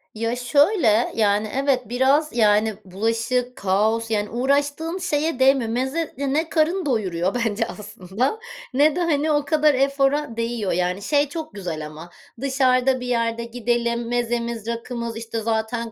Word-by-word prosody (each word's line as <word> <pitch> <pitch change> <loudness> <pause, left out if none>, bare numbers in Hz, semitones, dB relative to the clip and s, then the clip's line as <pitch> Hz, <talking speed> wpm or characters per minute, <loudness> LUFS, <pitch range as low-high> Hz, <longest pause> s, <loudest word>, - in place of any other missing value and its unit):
Ya, 230 +2 -1
şöyle, 250 - +3
yani, 210 -1 +1
evet, 270 -4 0
biraz, 270 +5 +2
yani, 215 0 +3
bulaşık, 230 +6 -1
kaos, 220 +4 0
yani, 210 -1 0
uğraştığın 285 +7 0
şeye 315 -5 -1
değmiyor. 265 -3 +4
Meze 265 +7 -2
ya 280 +1 -2
ne 315 +4 0
karın 335 +3 +1
doyuruyor 195 -6 -1
bence 225 -2 0
aslında 210 - -3 0.3
ne 290 +3 +4
de, - - -1
hani, 310 -2 +1
o 295 -1 +1
kadar 300 -1 +3
efora 275 -1 +1
değiyor. 230 -4 -2
Yani, 180 +2 -1
şey 290 +5 +1
çok 315 +1 -6
güzel 170 -6 -5
ama 155 +3 -10 0.3
dışarıda 260 -1 +2
bir 250 - -6
yerde 230 -1 0
gidelim, 235 0 -1
mezemiz, 235 -2 -2
rakımız, 235 0 -4
işte, 225 0 -4
zaten, 225 +1 -2
240 Hz, 145 wpm, -22 LUFS, 220-280 Hz, 0.3 s, değmiyor